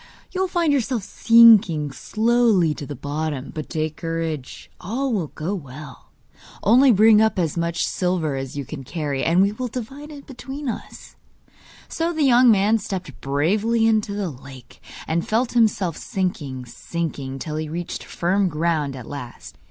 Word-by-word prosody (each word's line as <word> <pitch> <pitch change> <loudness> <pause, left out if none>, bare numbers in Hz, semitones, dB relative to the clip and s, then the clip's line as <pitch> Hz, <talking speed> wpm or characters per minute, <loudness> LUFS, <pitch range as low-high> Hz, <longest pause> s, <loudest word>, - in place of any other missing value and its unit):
You 375 - -2
will 380 - +1
find 345 -4 +1
yourself 250 -5 0
sinking 215 -11 +5
slowly 220 - +2
to 145 - -8
the 145 - -6
bottom; 145 0 -4
but 155 -2 -6
take 155 -2 -3
courage, 165 -5 -5
all 250 +7 -2
will 185 -7 -1
go 160 +7 -4
well. 145 -5 -9 0.5
Only 255 +5 +6
bring 215 0 +6
up 220 -2 +2
as 165 -5 0
much 170 0 -1
silver 180 -6 -1
as 135 +1 -5
you 140 - -4
can 140 +1 -8
carry, 145 -1 -3
and 175 +3 +4
we 200 - +2
will 250 +4 -4
divide 265 +5 -7
it 285 -2 -11
between 270 +2 -8
us.' 235 - -7 0.7
So 330 +1 -2
the 315 -2 0
young 250 -2 +6
man 215 +1 +4
stepped 190 -7 -6
bravely 205 +12 +1
into 215 -2 +1
the 200 -5 -2
lake, 130 -2 -14 0.3
and 165 +1 -1
felt 230 +3 +1
himself 210 -8 +2
sinking, 145 -9 -3
sinking, 140 -1 -5
till 155 +3 -5
he 155 -1 -4
reached 170 +2 -5
firm 190 +2 0
ground 155 -3 -1
at 125 -3 -8
last. 125 -3 -9
180 Hz, 165 wpm, -22 LUFS, 150-225 Hz, 0.7 s, Only